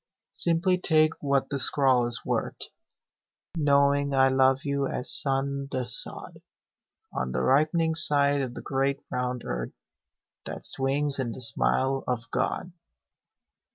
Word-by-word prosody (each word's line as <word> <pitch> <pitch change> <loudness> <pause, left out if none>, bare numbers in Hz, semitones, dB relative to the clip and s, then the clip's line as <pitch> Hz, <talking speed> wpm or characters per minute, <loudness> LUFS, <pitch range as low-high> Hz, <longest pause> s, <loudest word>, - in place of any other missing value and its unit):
Simply 175 +2 +1
take 155 -2 +2
what 140 -1 0
the 140 - -2
scrawl 130 -3 +2
is 120 - -2
worth - - -2 1.0
Knowing 140 -2 +2
I 135 0 +4
love 130 0 +3
you 140 -1 -1
as 125 - -2
sun 140 0 +1
the 130 -1 -2
sod 125 +1 -4 0.7
On 65 -1 -3
the 65 - -1
ripening 160 +4 +2
side 145 -3 +4
of 125 -2 -5
the - - -8
great 135 +1 -1
round 125 -1 -3
earth - - -4 0.7
That - - -7
swings 140 +1 -1
in 120 -3 -2
the 130 - -9
smile 130 +3 0
of 125 -2 -2
God. 180 - -2
135 Hz, 135 wpm, -26 LUFS, 130-145 Hz, 1.0 s, I